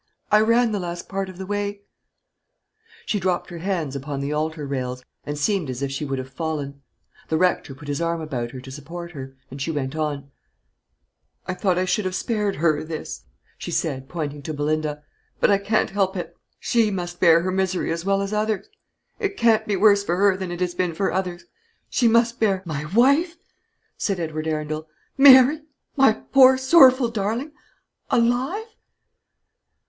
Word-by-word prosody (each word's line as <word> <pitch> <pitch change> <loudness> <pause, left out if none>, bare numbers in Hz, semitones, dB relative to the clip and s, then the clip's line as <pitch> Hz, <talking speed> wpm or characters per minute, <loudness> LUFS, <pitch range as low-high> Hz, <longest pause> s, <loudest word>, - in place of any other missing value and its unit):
I 210 - +6
ran 230 +1 +3
the 205 - -1
last 175 -1 -5
part 195 -1 -3
of 185 - -11
the 190 - -6
way 205 0 -3 0.6
" 450 +1 -30
She 210 - -1
dropped 180 -1 -1
her 170 - -7
hands 165 -6 -2
upon 140 +1 -4
the 140 +2 -2
altar 155 0 -2
rails, 125 -2 -4 0.2
and 145 0 -4
seemed 170 0 0
as 130 +2 -4
if 135 - -2
she 135 +2 -3
would 135 -1 -3
have 130 +1 -7
fallen. 145 -4 -4 0.5
The 160 - +1
rector 175 -5 0
put 145 +2 -12
his 145 +2 -2
arm 170 0 -1
about 130 -7 -4
her 130 - -9
to 130 +1 -10
support 170 +5 -8
her, 135 -4 -9 0.2
and 135 +1 -8
she 140 - -2
went 145 -2 -3
on: 145 -3 -3 1.1
"I 185 - -3
thought 185 -1 0
I 185 - +1
should 185 +2 0
have 185 0 -2
spared 210 -2 -1
her 155 -1 +1
this," 160 -1 -7 0.3
she - - -6
said, 135 +1 -2
pointing 150 -4 -4
to 155 +2 -5
Belinda; 150 0 -2 0.4
"but - - +4
I 200 - +4
can't 210 +2 0
help 195 -1 0
it. 175 - -6 0.2
She 230 -3 +2
must 175 -3 -5
bear 165 -2 +6
her 185 +1 -2
misery 190 -2 -1
as 165 0 -3
well 195 +1 +1
as 200 +1 -4
others. 210 -2 -1 0.5
It 400 -3 -2
can't 220 -2 +3
be 205 - +1
worse 200 +1 +5
for 175 -3 -1
her 195 +1 +3
than 185 -2 -5
it 175 +1 -6
has 180 -1 0
been 175 -2 -1
for 195 - 0
others. 180 -2 -3 0.5
She 240 - +3
must 230 +1 +3
bear 195 -4 +1
" - - -32
"My 150 -3 -4
wife!" 280 - +3 0.6
said 195 -3 -1
Edward 155 -1 -3
Arundel; 155 0 -3 0.3
"Mary, 275 +2 +7 0.3
my 270 -5 +5
poor 260 +3 +5
sorrowful 260 -3 +6
darling 230 +7 -2 0.6
alive?" 250 - +1
180 Hz, 185 wpm, -23 LUFS, 150-215 Hz, 1.1 s, Mary